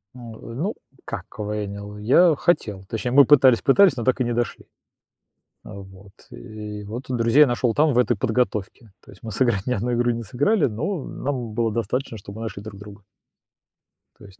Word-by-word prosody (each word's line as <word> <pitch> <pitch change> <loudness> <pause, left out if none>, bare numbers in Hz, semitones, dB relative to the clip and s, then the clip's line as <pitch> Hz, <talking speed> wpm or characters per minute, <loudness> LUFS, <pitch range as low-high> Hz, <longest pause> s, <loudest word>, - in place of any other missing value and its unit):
Н 120 -2 -10
э, - - -12 0.2
ну, 190 - -2 0.3
как - - -5
КВНил? 105 -1 -6
Я 150 +10 +4
хотел. 105 - 0
Точнее, 120 +2 -3
мы 140 0 +7
пытались 130 -4 +5
пытались, 185 +6 +5
но 115 - -3
так 130 +2 +1
и - - +4
не 120 0 -2
дошли. 120 -1 -3 1.0
Э, - - -11
вот 95 0 -13 0.2
и 105 -2 -8
вот, 115 +6 -7
и - - -1
друзей 120 +5 +5
нашёл 120 -1 0
там, 150 -1 +3
в 120 - +1
этой 120 -2 +2
подготовке. 110 -2 -2
То - - -15
есть 95 - -18
мы 110 - -7
сыграть 110 -4 0
ни 125 - 0
одну 120 +3 -1
игру 120 0 +1
не 115 0 -3
сыграли, 145 - +1
но 145 - -3
нам 125 -5 -4
было 115 -2 0
достаточно, 115 +2 -3
что 100 +1 -11
мы 110 +2 -8
нашли 105 -3 -6
друг 100 -2 -10
друга. 105 0 -12 1.2
То - - -15
есть. 100 +1 -17
115 Hz, 195 wpm, -23 LUFS, 105-130 Hz, 1.2 s, мы